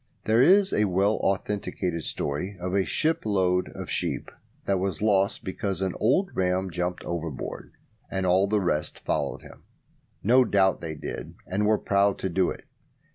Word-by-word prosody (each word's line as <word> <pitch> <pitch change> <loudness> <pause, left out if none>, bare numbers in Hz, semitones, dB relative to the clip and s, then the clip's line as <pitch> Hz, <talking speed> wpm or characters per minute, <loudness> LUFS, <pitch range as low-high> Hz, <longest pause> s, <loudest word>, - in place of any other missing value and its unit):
There 110 +2 +4
is 190 +7 +5
a 105 - +3
well 100 +3 +2
authenticated 95 -3 -2
story 90 +8 -3
of 90 +1 -3
a 95 -1 +2
ship 160 +1 0
load 95 -3 +1
of - - -6
sheep - - -2 0.3
that 100 -1 +1
was 95 -4 -2
lost 100 -1 +2
because 95 -1 -3
an 95 -2 -1
old 180 - +2
ram 95 0 0
jumped 90 +1 -2
overboard, 85 -5 -5 0.4
and 95 -1 -2
all 95 +2 +3
the 105 +1 +2
rest 75 -4 -1
followed - - -1
him. - - -14 0.6
No 125 +6 +6
doubt 95 -5 +2
they 80 -2 -5
did, 75 - -7
and 100 +3 0
were 110 0 +4
proud 100 0 +2
to 95 - -3
do 90 +1 +2
it. - - -7
95 Hz, 170 wpm, -26 LUFS, 90-105 Hz, 0.6 s, No